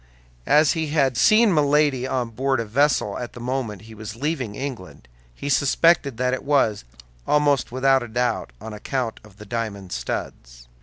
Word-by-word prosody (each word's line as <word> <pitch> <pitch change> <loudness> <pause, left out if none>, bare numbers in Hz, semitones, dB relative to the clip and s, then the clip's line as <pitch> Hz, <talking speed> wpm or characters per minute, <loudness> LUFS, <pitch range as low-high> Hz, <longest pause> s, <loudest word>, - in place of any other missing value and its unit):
As 150 0 +5
he 160 -1 -1
had 140 -4 +1
seen 215 - +5
Milady 145 -3 +2
on 125 -3 -2
board 130 +2 0
a 115 - -2
vessel 140 +7 +1
at 120 - -6
the - - -10
moment 120 -5 -3
he 110 0 -12
was 110 0 -8
leaving 130 -5 -3
England, 120 - -7 0.3
he - - -6
suspected 140 -1 +3
that 125 +1 0
it 130 - -3
was, 135 - +1 0.4
almost 145 -4 +2
without 135 +1 +3
a 120 - -6
doubt, 120 - -1
on 110 - -8
account 115 +2 -3
of 105 -2 -18
the 105 - -11
diamond 100 -4 -5
studs. - - -6
125 Hz, 170 wpm, -23 LUFS, 110-140 Hz, 0.4 s, As